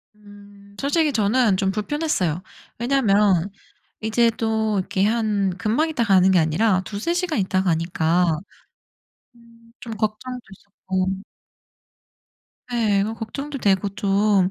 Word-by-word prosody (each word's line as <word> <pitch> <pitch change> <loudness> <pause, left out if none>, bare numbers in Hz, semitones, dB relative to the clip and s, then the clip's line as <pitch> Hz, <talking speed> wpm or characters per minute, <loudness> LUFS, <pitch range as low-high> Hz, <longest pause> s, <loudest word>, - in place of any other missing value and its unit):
음. 205 -1 -17
솔직히 300 +2 +1
저는 220 -2 +2
좀 190 -1 +1
불편했어요. 210 - -1 0.4
왜냐하면 210 -7 +2 0.5
이제 230 +2 +2
또 220 -3 -1
이렇게 190 +1 0
한 210 -4 0
금방 235 +11 +1
있다가 235 -10 +1
가는 185 0 +5
게 185 - +4
아니라 185 +5 +2
2-3 215 +11 -3
시간 350 -7 -1
있다 190 -1 +1
가니까 165 -1 +1 1.0
음 235 -1 -21 0.2
좀 230 -2 -6
걱정도 220 +4 -3
있었고 190 -1 -4 1.7
예. 210 -4 +2 0.2
걱정도 275 +5 -5
되고 200 -1 +1
좀 200 -1 +2
210 Hz, 230 characters per minute, -22 LUFS, 190-235 Hz, 1.7 s, 가는